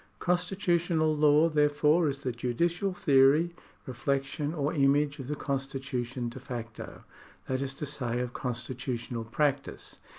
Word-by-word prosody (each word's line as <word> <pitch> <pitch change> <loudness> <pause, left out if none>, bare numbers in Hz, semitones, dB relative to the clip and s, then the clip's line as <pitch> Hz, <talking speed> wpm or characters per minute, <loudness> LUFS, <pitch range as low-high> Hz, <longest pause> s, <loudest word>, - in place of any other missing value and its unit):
Constitutional 175 -3 +1
law, 150 +1 +5
therefore, 150 +1 +3
is 140 0 -5
the 130 - -1
judicial 170 +11 -1
theory, 145 +1 +4 0.3
reflec 135 +2 0
tion, 145 +2 -4
or 150 -1 -1
image 145 0 +2
of 130 - -6
the 150 - -2
constitution 135 -3 -3
de 120 +2 -7
facto, 120 -3 -7 0.4
that 130 0 -2
is 135 0 -3
to 150 - -4
say, 125 -5 -2
of 125 0 -3
constitutional 120 -1 -4
practice. 140 +4 -2
140 Hz, 135 wpm, -29 LUFS, 125-150 Hz, 0.4 s, law